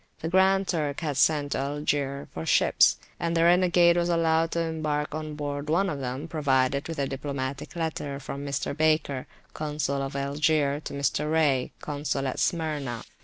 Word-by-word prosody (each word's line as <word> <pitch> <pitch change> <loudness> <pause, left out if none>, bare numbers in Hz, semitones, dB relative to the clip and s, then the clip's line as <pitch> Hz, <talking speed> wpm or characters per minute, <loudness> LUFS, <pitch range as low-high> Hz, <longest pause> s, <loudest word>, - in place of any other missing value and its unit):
The 160 - -2
Grand 190 +1 +3
Turk 150 -4 -1
had 150 -4 -2
sent 145 0 +2
to - - 0
Algier 140 0 -2
for 80 - -5
ships, - - +4 0.2
and 170 0 0
the 165 - +4
renegade 175 0 +5
was 175 0 +1
allowed 165 -1 +2
to 170 - 0
embark 155 -2 -2
on 155 -1 -5
board 145 0 -4
one 190 +5 +2
of 145 - -4
them 130 +4 -4
provided 140 -3 +1
with 165 - -5
a 140 - 0
diplomatic 135 +1 -4
letter[FN#2] 155 -4 -3
from 140 +1 -5
Mr. 140 0 -2
Baker, 155 -4 +1 0.3
Consul 150 -2 -2
of 135 0 -4
Algier, 145 +1 +1
to - - -5
Mr. 150 +2 0
Raye, 145 -5 +2
Consul 145 -2 -2
at 130 - -2
Smyrna. 150 -8 -1
150 Hz, 170 wpm, -27 LUFS, 140-160 Hz, 0.3 s, renegade